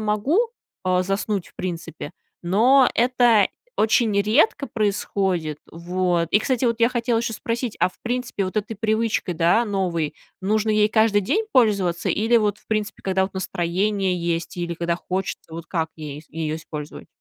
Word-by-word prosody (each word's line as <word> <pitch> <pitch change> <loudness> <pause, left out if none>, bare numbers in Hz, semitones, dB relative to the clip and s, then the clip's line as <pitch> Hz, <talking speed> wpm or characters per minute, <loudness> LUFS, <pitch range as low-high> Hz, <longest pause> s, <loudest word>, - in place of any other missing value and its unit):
могу, 215 - +1 0.5
а, 185 0 +2
заснуть, 195 0 -2
в - - -26
принципе, 175 -2 -5 0.3
но 245 +9 +5
это 240 -3 +4 0.3
очень 215 -1 +3
редко 275 - +2
происходит. 195 - -1
Вот, 175 0 0
и, 210 - +5
кстати, 255 +1 0
вот 230 -1 +1
я 230 - +5
хотела 240 -1 0
ещё 235 0 -2
спросить: 230 +1 -3
а - - +3
в - - -18
принципе, 245 -4 -2
вот 185 +3 -5
этой 215 +1 -1
привычкой, 220 -3 0
да, 170 +8 +3
новой, 180 -7 -1 0.3
нужно 215 +3 +1
ей 210 0 +4
каждый 220 -1 +3
день 410 - 0
пользоваться 200 -8 +2
или 225 +3 +2
вот, 210 -2 0
в - - -29
принципе, 215 -1 -2
когда, 190 0 +1
вот, 190 +1 -3
настроение 190 +1 -1
есть 170 0 -2
или 170 -1 -3
когда 170 0 -1
хочется? 185 -2 -4
Вот 165 0 -7
как 160 -3 -2
ей 150 -1 -7
её 155 0 -3
использовать? 150 -2 -8
200 Hz, 165 wpm, -23 LUFS, 175-225 Hz, 0.5 s, но